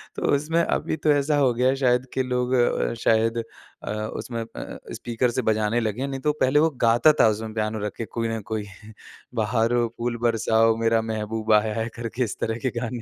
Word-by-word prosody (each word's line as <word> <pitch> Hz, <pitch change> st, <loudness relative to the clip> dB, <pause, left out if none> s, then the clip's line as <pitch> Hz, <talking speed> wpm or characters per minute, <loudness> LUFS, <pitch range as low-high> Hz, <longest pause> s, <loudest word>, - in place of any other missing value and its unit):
तो -, -, -6 dB
उसमें 160 Hz, +4 st, +1 dB
अभी 160 Hz, -, -1 dB
तो 155 Hz, -, +4 dB
ऐसा 145 Hz, +1 st, +1 dB
हो 130 Hz, -4 st, +3 dB
गया 125 Hz, +2 st, +1 dB
है 135 Hz, -, +1 dB
शायद 125 Hz, -1 st, +1 dB
कि 130 Hz, -, 0 dB
लोग 125 Hz, 0 st, -1 dB
अ, 120 Hz, -1 st, +2 dB
शायद 115 Hz, +1 st, +2 dB, 0.5 s
अ, -, -, -4 dB
उसमें 110 Hz, +2 st, -4 dB
अ, 115 Hz, -, -8 dB, 0.2 s
स्पीकर 120 Hz, +1 st, -1 dB
से 130 Hz, -, -1 dB
बजाने 110 Hz, +1 st, +1 dB
लगे 110 Hz, +2 st, -2 dB
हैं, 140 Hz, -, -1 dB
नहीं 135 Hz, -1 st, -4 dB
तो 150 Hz, +1 st, +1 dB
पहले 130 Hz, +3 st, +4 dB
वो 160 Hz, +1 st, +4 dB
गाता 120 Hz, +7 st, +5 dB
था -, -, +7 dB
उसमें 110 Hz, +1 st, -4 dB
पियानो 110 Hz, 0 st, -2 dB
रखे 110 Hz, +2 st, -4 dB
कोई 115 Hz, 0 st, -3 dB
ना 115 Hz, 0 st, -2 dB
कोई 105 Hz, -2 st, -2 dB, 0.8 s
बहारों 115 Hz, +1 st, +1 dB
फूल 120 Hz, 0 st, -2 dB
बरसाओ, 115 Hz, -1 st, +3 dB
मेरा 115 Hz, 0 st, +2 dB
महबूब 110 Hz, 0 st, -3 dB
आया 110 Hz, 0 st, -3 dB
है 115 Hz, -, -2 dB
करके 120 Hz, +1 st, -3 dB
इस 105 Hz, -, -4 dB
तरह 110 Hz, 0 st, -1 dB
के -, -, +2 dB
गाने। 120 Hz, 0 st, -4 dB
115 Hz, 210 wpm, -24 LUFS, 110-125 Hz, 0.8 s, था